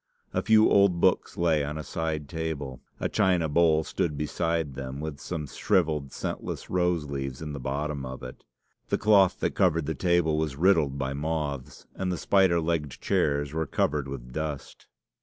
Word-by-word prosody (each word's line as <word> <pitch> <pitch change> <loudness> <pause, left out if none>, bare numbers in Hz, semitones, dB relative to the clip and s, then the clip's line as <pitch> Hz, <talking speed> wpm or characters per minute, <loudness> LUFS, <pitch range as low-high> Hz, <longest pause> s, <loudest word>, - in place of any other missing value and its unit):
A - - +1
few 110 -1 +5
old 100 -3 +4
books - - +2
lay 80 -4 +2
on 75 +2 -4
a 75 - -4
side 80 -2 -3
table. 75 -6 -4 0.2
A - - 0
china 90 -4 +2
bowl 80 0 +3
stood 75 -1 -2
beside 80 0 -1
them, 65 +1 -6
with 75 -1 -5
some 80 -4 -4
shrivelled, 75 -2 0
scentless - - -5
rose 90 -3 +1
leaves 70 -2 -4
in 75 -2 -5
the 70 - -5
bottom 70 +2 -3
of 65 0 -7
it. 65 - -9 0.5
The - - +2
cloth 100 -4 +4
that - - 0
covered 85 -4 +2
the 80 - -1
table 85 -3 +2
was 75 -3 -1
riddled 80 -4 +3
by 65 0 -2
moths, 75 -2 -3
and 95 -1 -2
the 90 - -2
spider 95 -3 +3
legged 80 -5 -2
chairs 70 0 0
were 80 -1 -1
covered 70 -1 0
with 60 -3 -8
dust. 75 -2 -5
75 Hz, 175 wpm, -27 LUFS, 70-85 Hz, 0.5 s, few